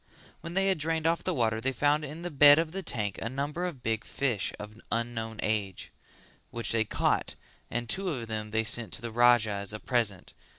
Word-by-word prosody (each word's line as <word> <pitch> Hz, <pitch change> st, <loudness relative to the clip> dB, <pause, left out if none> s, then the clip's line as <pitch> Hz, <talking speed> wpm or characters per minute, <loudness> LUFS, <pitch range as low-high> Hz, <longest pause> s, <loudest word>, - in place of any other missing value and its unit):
When 170 Hz, +1 st, -8 dB
they 195 Hz, 0 st, +3 dB
had 190 Hz, -4 st, +1 dB
drained 160 Hz, +1 st, -1 dB
off 165 Hz, +1 st, +2 dB
the 185 Hz, -, 0 dB
water 115 Hz, -7 st, 0 dB
they 135 Hz, +3 st, 0 dB
found 145 Hz, +4 st, +2 dB
in 150 Hz, +4 st, -7 dB
the 175 Hz, -, -3 dB
bed 145 Hz, 0 st, +8 dB
of 165 Hz, -1 st, 0 dB
the 195 Hz, +2 st, -4 dB
tank 105 Hz, -, -3 dB
a 115 Hz, -, -2 dB
number 145 Hz, +7 st, -3 dB
of 150 Hz, -9 st, -6 dB
big 110 Hz, 0 st, -1 dB
fish 125 Hz, -7 st, -1 dB
of 105 Hz, +2 st, -10 dB
unknown 115 Hz, -1 st, -2 dB
age: 105 Hz, -3 st, -2 dB, 0.6 s
which 115 Hz, 0 st, 0 dB
they 115 Hz, -1 st, +2 dB
caught -, -, 0 dB, 0.3 s
and 120 Hz, 0 st, -3 dB
two 190 Hz, +9 st, 0 dB
of 125 Hz, -8 st, -4 dB
them 110 Hz, -1 st, -4 dB
they 110 Hz, +1 st, +1 dB
sent 115 Hz, 0 st, -1 dB
to -, -, -3 dB
the 120 Hz, -, -4 dB
Raja 120 Hz, -1 st, +5 dB
as 100 Hz, +1 st, -3 dB
a 105 Hz, -, -5 dB
present. 110 Hz, -8 st, -1 dB
120 Hz, 215 wpm, -29 LUFS, 110-150 Hz, 0.6 s, bed